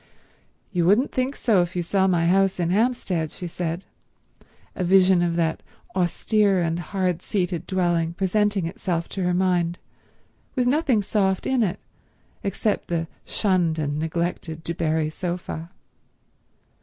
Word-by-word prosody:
"You 175 -2 +1
wouldn't 215 +8 +4
think 260 +1 -1
so 210 -6 +3
if 175 +1 -3
you 175 - 0
saw 190 +2 +2
my 175 -3 +2
house 190 +2 +3
in 170 -1 +1
Hampstead," 195 -7 0
she 180 - -7
said, 170 +1 -4 0.9
a 185 - -2
vision 185 0 +5
of 170 -1 +1
that 165 -2 0 0.3
austere 195 +2 +2
and 165 -1 0
hard 180 -1 -1
seated 180 -4 -2
dwelling 175 -3 +1
presenting 200 0 +1
itself 170 0 -2
to 195 - -4
her 180 0 +1
mind, 175 -2 +1 0.8
with 250 -2 +2
nothing 255 -5 +2
soft 190 -2 0
in 260 -2 +2
it 200 -3 0 0.6
except 200 +2 -1
the 165 -1 -1 0.2
shunned 180 -6 +1
and 150 -1 -1
neglected 160 0 -3
Du 170 - -3
Barri 160 -2 0
sofa. 175 -1 -4
180 Hz, 145 wpm, -24 LUFS, 170-195 Hz, 0.9 s, vision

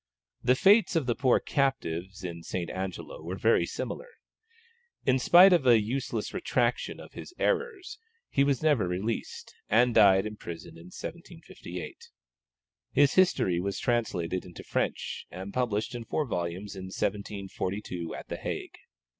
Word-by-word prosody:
The 125 +1 +4
fates 200 - +5
of 160 -5 +2
the 120 - +1
poor 130 0 +3
captives 95 - -1
in 85 -2 -5
St. 85 0 -4
Angelo 95 - -5
were - - -5
very - - +3
similar. - - -5 1.0
In 130 0 +3
spite 180 +8 +8
of 155 -7 +3
a 120 -2 +7
useless 120 +5 -3
retractation - - 0
of - - -12
his 360 - -10
"errors," 440 -3 -1 0.3
he 140 - +2
was 140 0 +1
never 145 - +3
released, 95 +6 -4 0.2
and 120 +3 +4
died 100 -3 +6
in 105 0 -6
prison 85 -4 -8
in 85 +1 -13
1758. 90 - -9 0.8
His 145 0 +4
history 135 - +3
was 100 +2 -2
translated 95 -7 -1
into 90 -2 -11
French, - - -2
and 95 +2 -8
published 110 -4 -1
in 120 -1 -5
four 150 +6 -1
volumes 90 -2 -4
in 95 -1 -7
1742 95 -2 -4
at - - -9
the - - -4
Hague. - - -5
110 Hz, 145 wpm, -29 LUFS, 95-135 Hz, 1.0 s, spite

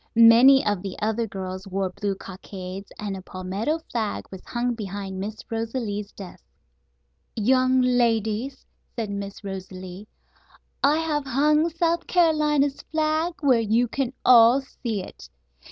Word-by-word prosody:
Many 235 +4 +7
of 205 -3 0
the 195 -1 -6
other 220 +2 -1
girls 190 -1 -6
wore 190 -1 -2
blue 200 +1 -3
cockades, 190 0 -9
and 205 -2 -4
a 190 - -7
palmetto 195 - -3
flag 220 -4 -2
was 190 -1 -9
hung 245 0 -1
behind 195 -3 -6
Miss 210 +3 -6
Rosalie's 225 -3 -3
desk. 185 - -11 0.9
"Young 255 +3 +3
ladies," 235 0 0 0.3
said 225 -5 -3
Miss 200 +1 -6
Rosalie, 190 0 -8 0.8
"I 290 +3 +4
have 305 -3 -1
hung 300 +5 +3
South 335 +1 0
Carolina's 300 -5 +2
flag 315 +2 -1
where 260 -5 +4
you 225 +3 +2
can 260 +1 -2
all 245 +1 +7
see 230 -6 -5
it. - - -12
225 Hz, 135 wpm, -24 LUFS, 195-270 Hz, 0.9 s, Many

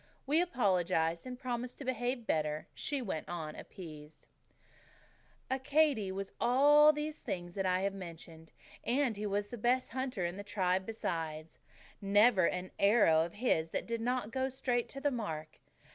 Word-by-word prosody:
We 305 +5 +3
apologized 180 - +1
and 250 -1 -6
promised 250 -1 -4
to 280 - -8
behave 245 -1 -2
better; 155 -4 -1
she 285 -3 -3
went 175 -8 -4
on, 160 -3 -5
appeased: 155 -4 -11 1.3
"Accadee 265 -5 +2
was 195 +1 -5
all 290 +5 +6
these 305 +1 -4
things 175 -1 -5
that 195 -1 -1
I 185 0 +2
have 200 0 0
mentioned, 165 -3 -10 0.3
and 255 -1 +1
he 210 +1 -3
was 205 +1 -1
the 240 - -7
best 250 +3 +1
hunter 255 -7 -2
in 175 +2 -3
the 205 - -6
tribe 190 -2 0
besides. 160 -7 -4 0.4
Never 205 -1 +5
an 180 0 -3
arrow 200 -6 +5
of 170 - -6
his 185 -8 +1
that - - -3
did 230 -1 -3
not 245 -2 -1
go 260 +2 0
straight 250 -2 -1
to 275 - -7
the 290 - +2
mark. 160 - -5
205 Hz, 160 wpm, -33 LUFS, 175-255 Hz, 1.3 s, all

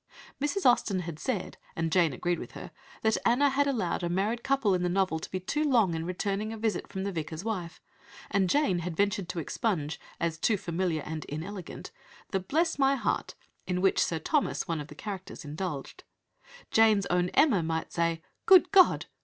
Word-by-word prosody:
Mrs. 360 +7 -1
Austen 210 -6 +3
had 165 -3 -6
said, 230 -8 -3 0.2
and 165 -1 -1
Jane 170 -3 +4
agreed 175 +6 -1
with - - -8
her, - - -9 0.3
that 220 0 +3
Anna 270 +4 +4
had 285 +1 +2
allowed 215 -12 -1
a 175 - -1
married 205 +7 0
couple 270 -7 +2
in 180 - +1
the 180 - +1
novel 185 -3 +1
to - - -7
be 185 - -3
too 295 +12 -1
long 235 - +3
in 165 +1 -3
returning 200 +3 -2
a 225 - -5
visit 215 -4 -1
from 190 -1 -5
the 200 - -2
Vicar's 160 0 -5
wife, 180 -7 -4 0.5
and 190 -2 +2
Jane 200 -10 +2
had 170 -1 -5
ventured 200 -2 0
to 180 - -4
expunge, 165 -2 -2 0.2
as 165 -2 -1
"too 215 +3 +2
familiar 170 -4 -2
and 155 0 -5
inelegant," 175 +5 -7 0.4
the 195 - +1
"Bless 315 - 0
my 275 0 +4
heart" 260 - -2 0.3
in 180 -1 0
which 190 0 +3
Sir 165 - -1
Thomas, 285 - 0
one 165 -3 -1
of 145 - -8
the - - -12
characters, 190 -5 -7
indulged. 150 -1 -5 0.7
Jane's 220 -3 +5
own 180 0 +2
Emma 265 - +5
might 160 0 -3
say 165 -1 0 0.2
"Good 375 -2 +7
God!" 380 -2 +6
190 Hz, 195 wpm, -29 LUFS, 170-225 Hz, 0.7 s, Good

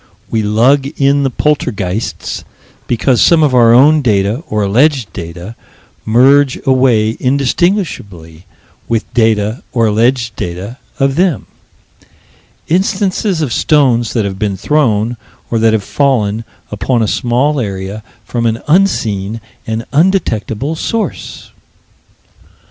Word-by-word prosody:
We 110 - +1
lug 120 +7 +2
in 140 +1 +3
the 135 - +1
poltergeists, 115 -8 -2 0.4
because 125 +1 +1
some 165 -2 +5
of 145 -4 +2
our 120 -2 +5
own 145 +6 +5
data, 105 +2 0
or 105 -1 0
alleged 125 +4 +1
data, 85 +6 -8 0.5
merge 135 +4 +4
away 125 -4 +2
indistinguishably 125 - -2 0.4
with 115 -2 0
data, 110 -1 +1
or 115 -2 +1
alleged 115 +2 +1
data, 95 +8 -6 0.2
of 135 +1 +1
them: 180 -3 +1 1.2
Instances 190 0 0
of 125 -6 -2
stones 125 -7 +2
that 110 -4 0
have 95 -1 -5
been 100 -3 -2
thrown, 115 -1 0 0.3
or 115 - +1
that 110 0 +3
have 110 -2 0
fallen, 115 -5 0 0.3
upon 110 +4 0
a - - 0
small 130 +7 0
area, 100 -1 -4 0.2
from 115 +1 -1
an 115 0 -2
unseen 115 - +1 0.3
and 110 +1 -3
undetectable 150 - 0
source. 225 +7 -4
120 Hz, 120 wpm, -13 LUFS, 105-140 Hz, 1.2 s, some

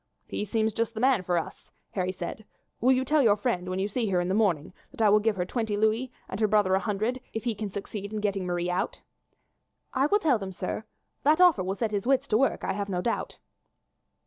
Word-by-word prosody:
"He 210 - -3
seems 220 +1 0
just 230 +1 -1
the - - -3
man 255 -3 +4
for 180 -1 0
us," 165 - -5 0.2
Harry 185 -1 -1
said. 185 +4 -6 0.4
"Will 255 +3 +4
you 260 0 +2
tell 300 +3 +3
your 220 -6 +5
friend, 190 -5 -1
when 185 - -2
you 195 +1 0
see 225 +2 -1
her 185 -2 +2
in 175 0 -1
the - - +1
morning, 185 -7 +1 0.2
that - - -16
I 220 -2 +5
will 210 +1 +6
give 215 0 +1
her 180 -2 -1
twenty 220 0 -2
louis 220 +4 +1 0.2
and 190 - -5
her 215 - +3
brother 205 -3 +3
a 190 - +4
hundred 220 +5 -1
if 225 - -3
he 235 -2 0
can 210 0 -4
succeed 200 +1 -6
in 215 - -3
getting 200 -3 -1
Marie 175 0 -1
out?" 330 - -2 0.9
"I 270 +2 +3
will 410 - +4
tell 300 - +2
them, 190 -1 -6
sir. 185 +4 -4 0.4
That 305 +3 +4
offer 355 - +6
will 190 +2 -2
set 220 0 -1
his 205 +2 -2
wits 270 -1 +2
to 215 - +4
work, 270 - +1
I - - 0
have 200 0 -3
no 180 -2 -1
doubt." 235 - -2
210 Hz, 245 wpm, -27 LUFS, 190-235 Hz, 0.9 s, will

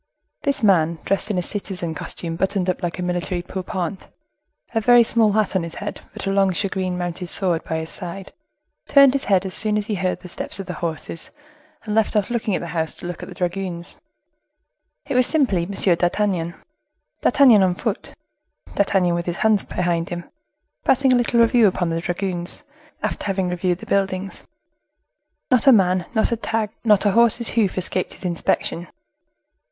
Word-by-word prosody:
This 280 -3 -1
man, 170 -5 +3
dressed 200 +2 0
in 205 - -1
a 180 - 0
citizen 180 -4 -3
costume 165 +1 -5
buttoned 190 +1 0
up - - -8
like 175 -1 -3
a 180 - -3
military 175 0 -2
pourpoint, 185 0 -4 0.7
a 225 - +1
very 240 +1 +6
small 220 -2 +2
hat 215 -2 +1
on 190 - +2
his 165 0 -6
head, 205 - -6
but - - -7
a 195 - 0
long 195 -1 +3
shagreen 185 -1 -2
mounted 175 0 -4
sword 175 -2 0
by 160 - -3
his 160 0 -5
side, 185 +2 -7 0.5
turned 275 -2 +6
his 275 - +1
head 195 -2 +2
as 190 - -4
soon 210 0 +1
as 210 - -1
he 215 - -3
heard 185 -2 -1
the 180 - -9
steps 180 - -4
of 195 - -5
the 180 - -5
horses, 165 0 -5 0.5
and 210 - -4
left 220 0 +1
off 210 +1 +1
looking 220 -4 0
at - - -2
the 170 - -6
house 160 -2 -1
to - - -9
look 175 0 -5
at - - -8
the 180 - -10
dragoons. 180 -1 -3 1.1
It 275 - -3
was 255 0 +4
simply 260 - +2
M. - - -6
d'Artagnan; 175 -1 +1 0.7
D'Artagnan 250 -8 +6
on 185 -2 +2
foot; 220 +1 -4 0.6
D'Artagnan 190 -3 +2
with 170 0 -2
his 175 +1 -2
hands 215 -2 +3
behind 175 -2 -2
him, 175 0 -5 0.6
passing 265 0 +3
a - - +5
little 240 -1 +2
review 230 -1 +5
upon 180 -3 0
the 165 0 -1
dragoons, 175 0 -3 0.4
after - - -2
having 190 -2 0
reviewed 180 0 0
the - - -11
buildings. 195 -1 -1 1.1
Not 255 +1 +3
a - - +10
man, 185 -5 +3
not 220 - +2
a 235 - 0
tag, 220 -1 -2
not 210 -3 +4
a 205 - +4
horse's 235 +1 +4
hoof 210 -6 +1
escaped 185 0 -2
his - - -12
inspection. 170 0 -1
190 Hz, 190 wpm, -22 LUFS, 175-215 Hz, 1.1 s, a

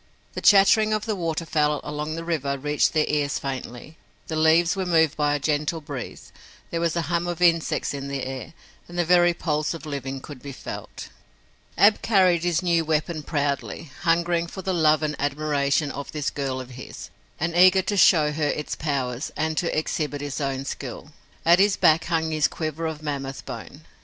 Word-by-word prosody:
The - - -5
chattering 215 +2 +5
of 215 -1 -1
the 220 -2 -1
waterfowl 160 -4 0
along 150 +1 -4
the 165 - -5
river 145 -5 -1
reached 150 +2 +1
their 155 -1 +2
ears 145 -1 0
faintly, 135 +2 -6 0.3
the 160 - -2
leaves 160 +3 +4
were 190 - -1
moved 160 -3 +3
by 145 -1 +1
a - - -2
gentle 150 +2 -1
breeze, 140 -5 -8 0.4
there 165 - -2
was 170 -1 0
a 170 - 0
hum 170 +2 -1
of 175 -1 -3
insects 170 -4 +2
in 140 -1 -5
the 140 -1 -3
air 130 +3 -6 0.3
and 175 - -9
the 175 - +2
very 175 0 +4
pulse 155 -1 -1
of 165 - -9
living 135 -2 -4
could 135 -1 -11
be 140 -1 -8
felt. - - -8 0.7
Ab 205 +1 +5
carried 185 -6 +3
his 175 -1 +1
new 170 -2 +2
weapon 155 +1 -1
proudly, 145 0 -3
hungering 170 0 +1
for 190 +2 -8
the 190 - -1
love 155 -2 +3
and 150 -1 -1
admiration 145 0 0
of 140 0 -7
this 150 -2 -2
girl 135 -2 -3
of 130 0 -8
his, 125 +1 -9 0.3
and 165 +2 -1
eager 185 +1 +6
to 205 - -1
show 155 -6 +5
her 150 0 -1
its 150 +1 -3
powers 135 -4 -2
and 160 +1 -1
to 170 - -1
exhibit 150 -2 -2
his 145 +1 -4
own 135 -1 -2
skill. 135 +2 -7 0.3
At 170 +2 +6
his 200 0 +4
back 160 +1 +4
hung 160 -2 0
his 155 -2 +2
quiver 160 0 -4
of 155 -1 -6
mammoth 140 -2 -4
bone. - - -8
155 Hz, 190 wpm, -24 LUFS, 145-170 Hz, 0.7 s, eager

